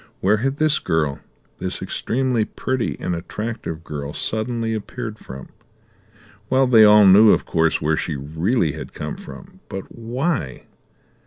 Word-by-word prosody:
Where 105 +3 +3
had 135 +5 -1
this 155 -1 +2
girl, 75 -4 -1 0.4
this - - -3
extremely 125 -2 -1
pretty 130 +3 -3
and 90 - -2
attractive 105 -2 -5
girl, 75 -2 -6
suddenly 115 0 -2
appeared 110 0 -6
from? 65 0 -10 1.0
Well, 130 0 +4
they 115 -4 +6
all 105 0 +8
knew, 100 +3 +8
of - - +3
course, 80 -1 +1
where 80 +1 +1
she 80 - -2
really 80 - 0
had 80 - -8
come - - -5
from; 95 - -12
but 95 0 -7
why? 120 - -3
105 Hz, 145 wpm, -21 LUFS, 80-120 Hz, 1.0 s, all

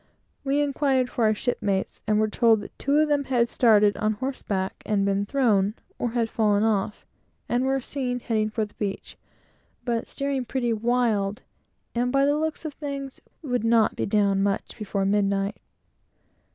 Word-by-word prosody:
We 280 +1 +1
inquired 275 -3 +1
for 235 - +1
our 215 - +4
shipmates, 205 -5 -2
and 215 0 +3
were 215 - +3
told 225 0 +3
that - - -11
two 280 +2 +1
of 310 0 +4
them 290 -1 +1
had 245 -3 +2
started 210 -4 +4
on 215 0 +1
horseback 205 -5 -3
and 210 -2 0
had - - +1
been 200 +1 0
thrown 215 -6 +2 0.2
or 240 -2 -2
had 235 -2 +1
fallen 210 -2 +2
off, 210 -2 0 0.4
and 245 +2 +1
were 270 0 +1
seen 250 -1 -3
heading 220 -3 0
for 215 0 -1
the 210 - -17
beach, 200 -2 -5 0.7
but 235 -2 -1
steering 275 -2 -2
pretty 240 -1 -1
wild, 220 -3 0 0.5
and 245 +1 0
by 275 +1 +3
the 290 +1 +3
looks 315 +1 -2
of 305 - -4
things, 275 -2 -6 0.2
would 245 -6 -1
not 230 -1 +3
be - - -2
down 200 -2 +2
much 200 0 -1
before 200 -3 -2
midnight. 200 0 +1
230 Hz, 175 wpm, -25 LUFS, 210-265 Hz, 0.7 s, our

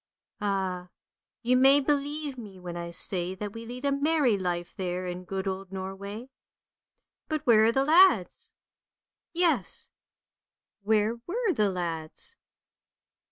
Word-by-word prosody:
Ah, 190 -3 -2 0.5
you 250 +2 +3
may 270 +2 +6
believe 290 0 -1
me 210 -6 -10
when 175 -1 -7
I 170 0 -5
say 180 +1 0
that 205 +1 -6
we 230 0 -8
load 250 +3 -6
a 280 - +2
merry 280 -4 +2
life 175 -2 -3
there 185 -1 -3
in 180 0 -5
good 190 +1 -4
old 190 0 -4
Norway. 200 +6 -6 1.0
But 310 -2 -3
where 220 -3 +6
are 225 - +4
the 270 +3 +1
lads? 320 - +4 0.4
" - - -65
Yes. 345 -1 0 0.9
where 215 +2 +1
were 435 +1 0
the 210 -7 +2
lads? 165 -4 -3
210 Hz, 135 wpm, -28 LUFS, 185-275 Hz, 1.0 s, may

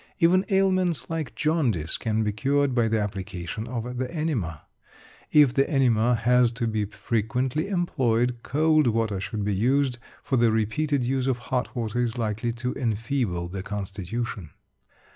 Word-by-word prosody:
Even 185 +1 +4
ailments 185 -5 +1
like 160 -3 -3
jaundice 125 - 0
can 110 -1 0
be 105 - 0
cured 140 +5 +1
by 120 -2 +2
the 110 0 +1
application 100 0 -4
of 120 0 -4
the 130 +2 -2
enema. 130 - -2 0.7
If 145 -5 +6
the 135 0 +2
enema 125 -5 +3
has 120 +1 +3
to 115 +1 -2
be 110 -2 0
frequently 125 - -1
employed, 125 - +1
cold 155 +1 +3
water 110 -3 0
should 105 +2 -3
be 105 - 0
used, 125 +4 +1 0.2
for 130 - 0
the 115 -1 +4
repeated 125 +6 0
use 130 +1 0
of 130 -2 +1 0.2
hot 125 +1 -1
water 120 0 -1
is 120 -1 -1
likely 110 +1 -1
to 125 +2 -3
enfeeble 115 -6 -1
the 95 +2 -5
constitution. 100 -1 -5
120 Hz, 155 wpm, -25 LUFS, 110-140 Hz, 0.7 s, If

